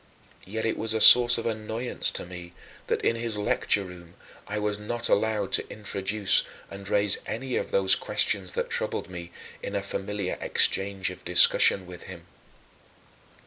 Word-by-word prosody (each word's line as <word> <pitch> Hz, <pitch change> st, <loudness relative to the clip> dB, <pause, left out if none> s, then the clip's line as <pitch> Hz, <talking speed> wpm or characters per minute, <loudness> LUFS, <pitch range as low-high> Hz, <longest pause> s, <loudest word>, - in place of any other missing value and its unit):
Yet 110 Hz, +4 st, -4 dB
it 110 Hz, -, -2 dB
was 110 Hz, 0 st, -1 dB
a -, -, 0 dB
source 120 Hz, +1 st, +8 dB
of 115 Hz, -, -5 dB
annoyance 110 Hz, +2 st, -3 dB
to -, -, -4 dB
me 90 Hz, -1 st, -10 dB, 0.3 s
that, -, -, -2 dB
in 115 Hz, -, +1 dB
his 115 Hz, -2 st, -4 dB
lecture 105 Hz, -1 st, 0 dB
room, 90 Hz, -1 st, -13 dB, 0.3 s
I 105 Hz, -, -4 dB
was 105 Hz, 0 st, -2 dB
not 115 Hz, +3 st, -4 dB
allowed 105 Hz, -1 st, 0 dB
to -, -, -1 dB
introduce 100 Hz, -1 st, +1 dB, 0.3 s
and 100 Hz, 0 st, -8 dB
raise 100 Hz, -1 st, +2 dB
any 130 Hz, +2 st, -4 dB
of -, -, -2 dB
those 95 Hz, -1 st, +3 dB
questions 95 Hz, -3 st, 0 dB
that -, -, -3 dB
troubled -, -, -3 dB
me, 85 Hz, -1 st, -8 dB, 0.3 s
in 100 Hz, -, -6 dB
a 100 Hz, -, -2 dB
familiar 100 Hz, -1 st, -4 dB
exchange 95 Hz, -1 st, 0 dB
of 90 Hz, -, -12 dB
discussion 90 Hz, +1 st, +4 dB
with 90 Hz, -1 st, -11 dB
him. 90 Hz, -3 st, -11 dB
100 Hz, 165 wpm, -26 LUFS, 95-110 Hz, 0.3 s, source